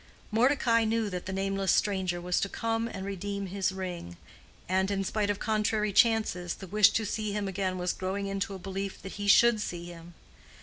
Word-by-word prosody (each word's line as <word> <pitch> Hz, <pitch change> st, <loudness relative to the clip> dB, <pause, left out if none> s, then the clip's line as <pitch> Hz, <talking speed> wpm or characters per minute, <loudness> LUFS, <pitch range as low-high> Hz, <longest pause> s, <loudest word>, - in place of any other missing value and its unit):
Mordecai 230 Hz, 0 st, +3 dB
knew 220 Hz, -1 st, 0 dB
that 180 Hz, 0 st, -5 dB
the -, -, -3 dB
nameless 195 Hz, 0 st, 0 dB
stranger 190 Hz, -4 st, +1 dB
was 180 Hz, 0 st, 0 dB
to 195 Hz, -, -1 dB
come 225 Hz, +1 st, -1 dB
and 190 Hz, -4 st, -6 dB
redeem 200 Hz, +1 st, -4 dB
his 195 Hz, +1 st, -1 dB
ring; 180 Hz, -, -6 dB, 0.5 s
and, 190 Hz, +1 st, +1 dB
in 195 Hz, -1 st, 0 dB
spite 205 Hz, +1 st, -1 dB
of 205 Hz, -, 0 dB
contrary 215 Hz, -1 st, 0 dB
chances, 215 Hz, -6 st, +2 dB
the 195 Hz, -, -9 dB
wish 210 Hz, +3 st, +5 dB
to 220 Hz, -, -1 dB
see 215 Hz, 0 st, -2 dB
him 205 Hz, -1 st, -2 dB
again 190 Hz, -1 st, -2 dB
was 180 Hz, 0 st, -1 dB
growing 190 Hz, +2 st, -3 dB
into 195 Hz, 0 st, -3 dB
a -, -, -5 dB
belief 195 Hz, +1 st, -5 dB
that 195 Hz, -, -6 dB
he 205 Hz, -, -2 dB
should 225 Hz, +1 st, +6 dB
see 175 Hz, -4 st, -4 dB
him. 170 Hz, 0 st, -11 dB
195 Hz, 200 wpm, -29 LUFS, 185-215 Hz, 0.5 s, should